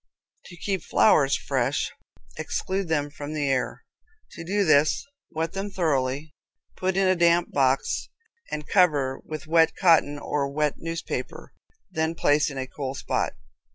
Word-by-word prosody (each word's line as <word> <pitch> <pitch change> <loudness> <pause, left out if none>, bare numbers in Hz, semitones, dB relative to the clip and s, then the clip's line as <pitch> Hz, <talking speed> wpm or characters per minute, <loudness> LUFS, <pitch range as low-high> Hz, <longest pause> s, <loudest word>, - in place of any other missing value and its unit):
To 175 - -12
Keep 190 +1 -2
Flowers 145 -10 +4
Fresh - - -1 0.4
exclude 190 0 -2
them 145 -2 0
from 145 +1 -7
the 145 -2 0
air. 135 -2 -1 0.5
To 165 - -8
do 200 +4 0
this 155 -1 +3 0.2
wet 160 +1 -3
them 195 +1 -3
thoroughly, 145 -5 -1 0.4
put 185 0 -1
in 195 -1 +3
a 185 - +4
damp 170 0 +3
box, 135 -1 +1 0.4
and 150 0 -5
cover 145 -8 +2
with 155 -1 -7
wet 165 0 +4
raw 185 - +3
cotton 145 -3 +4
or 145 -1 -2
wet 150 0 0
newspaper, 165 0 -5 0.4
then 160 -1 -1
place 150 -2 +2
in 140 - -8
a 130 - -2
cool 135 0 -5
spot. - - -1
155 Hz, 155 wpm, -25 LUFS, 145-175 Hz, 0.5 s, Flowers